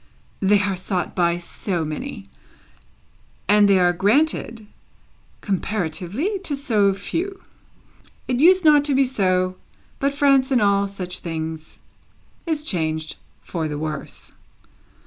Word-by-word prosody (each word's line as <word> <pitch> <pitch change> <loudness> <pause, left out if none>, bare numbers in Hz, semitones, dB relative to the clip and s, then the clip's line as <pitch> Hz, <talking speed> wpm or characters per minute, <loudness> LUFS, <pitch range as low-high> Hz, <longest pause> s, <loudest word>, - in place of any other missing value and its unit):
They 200 +1 +3
are 195 -1 0
sought 185 0 -3
by 170 -1 +1
so 175 0 -3
many, 150 -10 -6 1.2
and 205 +1 +5
they 195 - +5
are 175 -1 +3
granted 225 - +1 0.8
(comparatively) 200 - -2
to 340 -6 -3
so 215 -8 +2
few! 370 - -4 0.8
It 250 -1 0
used 360 +3 +5
not 295 -2 +6
to 285 -2 +2
be 270 0 +4
so, 185 -6 0 0.4
but 280 +1 +1
France 275 -1 +3
in 255 - +4
all 200 -1 +2
such 185 -2 -5
things 160 -1 -6 0.7
is 310 -2 -1
changed 160 - -2 0.3
for 165 -3 -3
the 150 -1 -4
worse. 155 -1 -6
200 Hz, 125 wpm, -22 LUFS, 175-275 Hz, 1.2 s, not